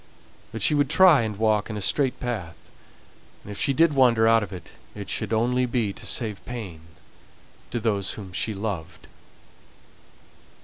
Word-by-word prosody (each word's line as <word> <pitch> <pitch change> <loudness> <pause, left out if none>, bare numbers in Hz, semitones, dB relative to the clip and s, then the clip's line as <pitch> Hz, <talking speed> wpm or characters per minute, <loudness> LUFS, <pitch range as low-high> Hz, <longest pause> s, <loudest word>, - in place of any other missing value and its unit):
But 110 -3 -4
she - - +4
would 145 -2 +2
try 165 -3 +6
and 110 -3 -3
walk 110 -1 +1
in 110 - -4
a - - -3
straight 125 +7 0
path; 105 -10 -6 0.7
and 105 - -9
if 100 - -8
she 140 - +2
did 160 +3 +3
wander 120 -5 +4
out 115 0 +5
of 105 - -6
it, 90 -4 -10 0.2
it 100 -2 -6
should 110 -1 -3
only 125 +3 +1
be 115 -5 -1
to - - -8
save 105 -6 -2
pain 105 -10 -7 0.9
to 120 - -3
those 105 -4 -1
whom 95 -4 -9
she 105 +5 -2
loved. 95 -5 -5
110 Hz, 170 wpm, -24 LUFS, 100-125 Hz, 0.9 s, try